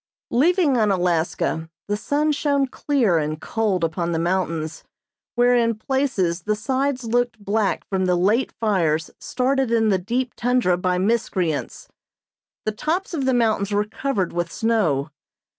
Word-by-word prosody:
Leaving 305 +1 +3
Unalaska 175 -5 0 0.2
the 205 - 0
sun 290 +8 0
shone 285 -1 +1
clear 255 - +1
and 155 0 -3
cold 205 -4 -1
upon 170 +1 -1
the - - 0
mountains 165 -2 -2 0.5
where 245 +1 +4
in 230 -1 +2
places 215 -8 -1
the 210 +4 0
sides 260 +4 -1
looked 240 0 0
black 205 0 -1
from 190 -1 0
the 180 - +3
late 205 +8 +2
fires 170 -8 0
started 265 0 0
in 225 -1 +2
the 190 -2 +2
deep 240 +6 -2
tundra 245 -7 +2
by 180 0 0
miscreants. 185 -6 -1 0.8
The 215 - +1
tops 330 - -2
of 280 -5 -1
the 260 - +2
mountains 215 -4 +1
were 205 +1 +1
covered 210 -4 -2
with 175 -1 -2
snow. 170 -11 0
215 Hz, 145 wpm, -22 LUFS, 180-250 Hz, 0.8 s, where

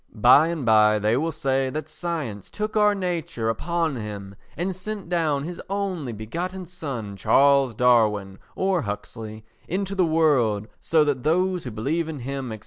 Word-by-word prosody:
By 125 +8 +6
and 165 -6 -3
by 110 -1 +5
they 105 +2 +1
will 160 +5 0
say 135 -3 0
that 155 +3 -4
science 155 - -4
took 215 +1 -4
our 210 -1 +4
nature 170 - -2
upon 165 +4 -1
him, 100 -3 -6 0.2
and 180 +3 -2
sent 195 -1 -6
down 155 -5 +1
his 175 +3 -6
only 190 -9 -2
begotten 175 - -5
son, 135 - -6
Charles 135 +4 +4
Darwin, 105 -5 +2 0.2
or 190 -2 +1
Huxley, 110 0 -6 0.2
into 195 +2 -2
the 190 - +1
world 140 -11 +2
so 160 -2 +3
that 145 -4 0
those 180 +4 +1
who - - -3
believe 145 +10 -2
in 155 - -5
him, 135 0 -4
&c. 110 - -6
145 Hz, 165 wpm, -24 LUFS, 110-175 Hz, 0.2 s, By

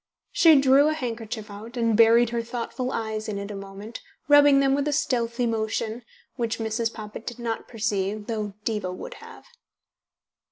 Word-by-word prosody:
She 320 -4 +6
drew 275 +2 +5
a 310 - +2
handkerchief 230 -5 -5
out, 220 +4 -9
and 230 -2 +2
buried 230 +1 +5
her 235 -1 -1
thoughtful 245 +2 -4
eyes 220 -2 -3
in 205 - -3
it 200 +1 -5
a - - -6
moment, 195 +3 -9 0.3
rubbing 290 -1 +7
them 270 -1 +3
with 285 +1 0
a - - +1
stealthy 240 -4 0
motion, 225 +1 -2 0.3
which 230 -2 -1
Mrs. 225 +1 -1
Poppit 215 0 -8
did 240 - -6
not 230 -2 -4
perceive, 210 -2 -2
though 210 -3 -4
Diva 210 -5 -2
would - - -7
have. - - -13
230 Hz, 170 wpm, -25 LUFS, 215-245 Hz, 0.3 s, rubbing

